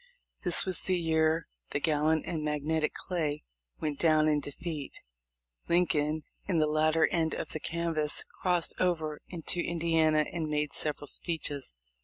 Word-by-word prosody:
This 175 -2 +4
was 185 -3 -1
the 185 -1 +1
year 160 -1 +2 0.2
the - - -1
gallant 155 +1 +2
and 160 -3 -3
magnetic 150 +1 0
Clay 155 -5 -2 0.4
went 150 -3 -2
down 155 -2 +4
in 150 -1 +3
defeat. 145 0 -6 0.7
Lincoln, 155 -3 +2 0.2
in 185 -4 +1
the 155 - +4
latter 155 +1 +3
end 160 -2 +1
of - - -4
the 155 - -4
canvass, 165 -2 0 0.2
crossed 180 -2 +1
over 160 -4 0
into 175 0 -2
Indiana 160 -2 +2
and 165 -3 -2
made 150 -1 -1
several 150 -1 -3
speeches. 145 - -2
155 Hz, 145 wpm, -30 LUFS, 150-170 Hz, 0.7 s, This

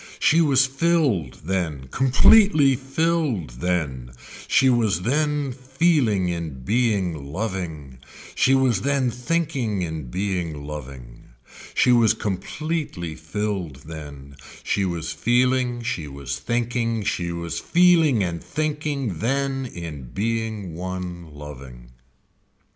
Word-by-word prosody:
She 165 +2 +4
was 135 -4 +4
filled 135 - +1
then, 80 -8 -2
completely 140 - +5
filled 135 - -1
then, 70 -9 -2 0.3
she 135 - +4
was 110 -8 +2
then 145 +2 0
feeling 130 - +1
in 80 -7 -4
being 100 - 0
loving, 80 - -4 0.3
she 135 - +4
was 130 -7 +2
then 135 -3 +1
thinking 125 - -1
in 80 -6 -5
being 90 -3 -2
loving. 65 -5 -9 0.5
She 125 - +4
was 115 -3 +5
completely 105 - -3
filled 90 0 -3
then. 70 -3 -9 0.3
She 100 - 0
was 85 -2 -3
feeling, 120 +6 +1
she 115 -11 -3
was 70 -1 -5
thinking, 115 - -1
she 90 -4 -1
was 85 -1 -4
feeling 165 - +4
and 85 -2 -3
thinking 145 - -2
then 135 +2 -1
in 80 - -7
being 110 -3 -2
one 90 -1 -5
loving. 65 -5 -11
105 Hz, 110 wpm, -23 LUFS, 80-130 Hz, 0.5 s, completely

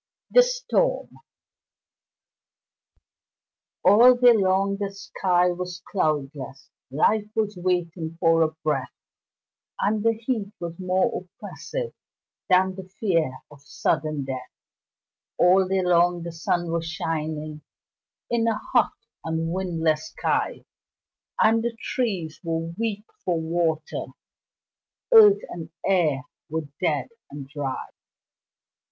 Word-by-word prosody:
The - - +8
Storm - - 0 2.8
All 235 +7 +8
day 245 0 +6
long 195 -1 +2
the 200 -1 -2
sky 180 -2 +1
was 180 0 -6
cloudless, 140 - -2 0.2
Life 210 +10 +1
was 215 -2 0
waiting 175 -2 -2
for 165 -1 +4
a 160 - +4
breath, 140 -5 -1 0.8
And 210 +1 +1
the 230 0 +4
heat 225 -3 -3
was 170 0 -6
more 185 0 0
oppressive 480 - -7 0.6
Than 185 0 +4
the 185 0 -10
fear 165 - 0
of 145 -1 -15
sudden 150 0 -1
death; 130 -1 -5 0.9
All 185 +1 +5
day 190 0 +1
long 175 -1 +3
the 170 - -5
sun 170 +1 -1
was 165 -1 -2
shining 155 -2 -3 0.7
In 230 -1 +2
a 225 -2 +1
hot 245 - +1 0.3
and 160 +1 -2
windless 165 -4 0
sky, - - -1 0.7
And 225 +1 +4
the 235 -1 -3
trees 190 -11 -2
were 165 0 -3
weak 215 0 -3 0.2
for 175 -3 0
water 160 -1 -1 1.1
Earth 420 -3 +8
and 165 -2 -7 0.2
air 160 -8 +2 0.3
were 155 -1 -3
dead 165 - 0 0.2
and 140 -1 -8
dry. 140 -2 -4
175 Hz, 110 wpm, -25 LUFS, 160-200 Hz, 2.8 s, The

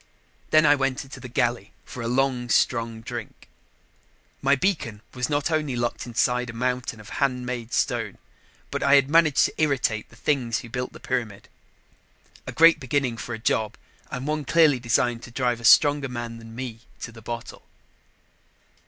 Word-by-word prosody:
Then 155 0 +5
I 145 - +7
went 135 -2 0
to 130 - -8
the 130 - -8
galley 120 -4 -1
for 125 - -8
a 115 - -3
long, 125 -1 0
strong 115 -2 +1
drink. - - -8 0.9
My 140 +1 +4
beacon 130 - -1
was 125 +1 -2
not 145 +2 0
only 150 -5 0
locked 120 0 -2
inside 125 +1 0
a - - -6
mountain 125 -1 -2
of 105 - -12
handmade 125 -3 -1
stone, - - -1 0.5
but - - -2
I 140 - +5
had 140 0 +3
managed 165 -3 +5
to - - -3
irritate 130 -7 0
the - - -18
things 120 -2 0
who 120 - -11
had - - -19
built 125 0 -4
the - - -11
pyramid. 115 -6 -4 1.0
A - - -3
great 165 0 +6
beginning 130 -2 -1
for 120 +1 -5
a - - -7
job 110 -1 -1 0.3
and 125 +1 -5
one 150 0 -1
clearly 155 -3 +4
designed 120 0 +1
to - - -10
drive 120 0 -1
a - - -12
stronger 145 +3 +5
man 120 -2 -6
than 115 0 -12
me 120 -3 -6 0.2
to 120 - -6
the 115 0 -13
bottle. 120 +1 -7
125 Hz, 180 wpm, -25 LUFS, 115-140 Hz, 1.0 s, I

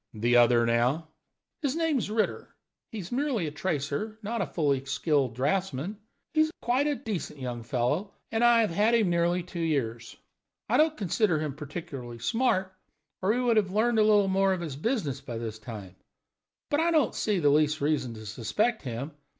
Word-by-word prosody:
"The 120 +3 +2
other, 120 -1 +5
now?" 125 +7 +1 0.5
"His 285 -2 0
name's 320 -10 0
Ritter. 215 0 -2 0.4
He 225 - -6
is 185 -4 -7
merely 255 - 0
a 150 - -3
tracer, 160 +6 -2
not 225 +3 -2
a - - -1
fully 140 -5 0
skilled 140 -3 0
draughtsman. 160 - -1 0.3
He 310 - +4
is 315 0 +2
quite 255 +5 +1
a 295 - +1
decent 205 - -5
young 120 -2 -4
fellow, 130 - -1 0.2
and 225 +1 +1
I 240 -1 +6
have 215 - +1
had 210 +7 +3
him 175 -4 +2
two 180 -1 -7
years. 120 -8 -2 0.5
I - - +2
don't 310 0 +3
consider 195 -2 +1
him 150 -2 -3
particularly 140 -5 -7
smart, 190 - 0 0.5
or 190 +2 +2
he 240 - +1
would 240 -3 +2
have 200 -3 +3
learned 220 +4 +2
a - - +6
little 210 -2 +4
more 195 0 +3
of 185 - -3
his 155 -6 -5
business 155 - -2
by 120 -4 -6
this 110 -1 -5
time. 105 -5 -9 0.8
But 290 - +2
I 335 +1 +3
don't 310 -6 +2
see 210 -2 0
the 150 -5 +3
least 150 +1 +3
reason 140 -5 0
to 110 0 -10
suspect 125 - -1
him. 130 +3 -5
170 Hz, 185 wpm, -28 LUFS, 135-220 Hz, 0.8 s, I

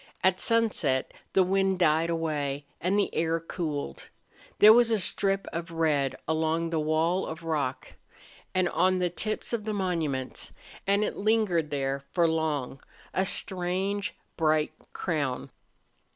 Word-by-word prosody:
At 185 0 +3
sunset 210 - +1 0.2
the 190 - +5
wind 190 0 +1
died 165 -1 +3
away 150 -4 -2 0.2
and 185 +4 +1
the 205 - +1
air 165 0 +1
cooled. 155 - -5 0.5
There 215 +1 +9
was 240 0 +5
a 225 - +3
strip 195 +1 +1
of 170 +1 -4
red 155 -5 +1
along 160 +1 0
the 160 - +1
wall 160 +4 +1
of 160 +1 -7
rock 150 -5 -2 0.6
and 185 -1 +3
on 185 +2 +2
the 180 -1 0
tips 215 +6 -3
of 230 -3 -1
the 215 0 -2
monuments, 160 -9 -2 0.3
and 200 +1 +3
it - - -2
lingered 200 -7 +1
there 140 -1 -2
for 170 -2 +4
long, 155 -5 -1 0.3
a 190 0 +1
strange, 190 +3 0 0.2
bright 155 -1 +2 0.2
crown. 145 -7 -2
165 Hz, 140 wpm, -28 LUFS, 155-190 Hz, 0.6 s, There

